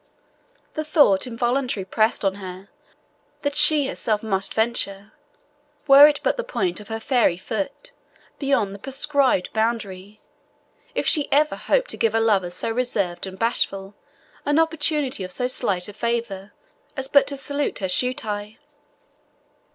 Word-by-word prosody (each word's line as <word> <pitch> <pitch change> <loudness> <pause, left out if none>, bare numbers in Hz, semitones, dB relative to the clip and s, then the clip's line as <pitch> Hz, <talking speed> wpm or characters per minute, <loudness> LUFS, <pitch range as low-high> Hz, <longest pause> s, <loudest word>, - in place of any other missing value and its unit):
The 310 - -3
thought 290 - +3
involuntarily 240 -3 -1
pressed 215 +2 0
on 195 - +2
her 185 +1 -9 0.7
that 285 -1 -1
she 295 -1 +5
herself 220 -5 -1
must 195 -3 -1
venture, 215 -3 -1 0.7
were 280 0 +9
it 295 -1 0
but - - 0
the 485 - -2
point 375 - -2
of 210 - -12
her 225 +1 -4
fairy 230 -7 +1
foot, 225 - -5 0.5
beyond 255 -9 0
the 200 - -10
prescribed 270 -4 0
boundary, 215 -3 -3 0.8
if - - -1
she 295 -4 +2
ever 300 +2 +3
hoped - - 0
to - - -7
give 225 -1 +1
a - - +3
lover 205 -5 +2
so 180 +5 -3
reserved 205 -7 -2
and 190 0 -9
bashful 195 -3 -1 0.5
an 290 +1 +1
opportunity 300 - 0
of 185 - -6
so 250 - -1
slight 200 -8 +1
a 205 - -9
favour 230 -4 -3 0.5
as 265 0 0
but 280 0 +4
to 280 - -3
salute 285 +1 -2
her 190 - -2
shoe 250 +7 +1
tie. 210 -4 -5
230 Hz, 150 wpm, -22 LUFS, 200-280 Hz, 0.8 s, were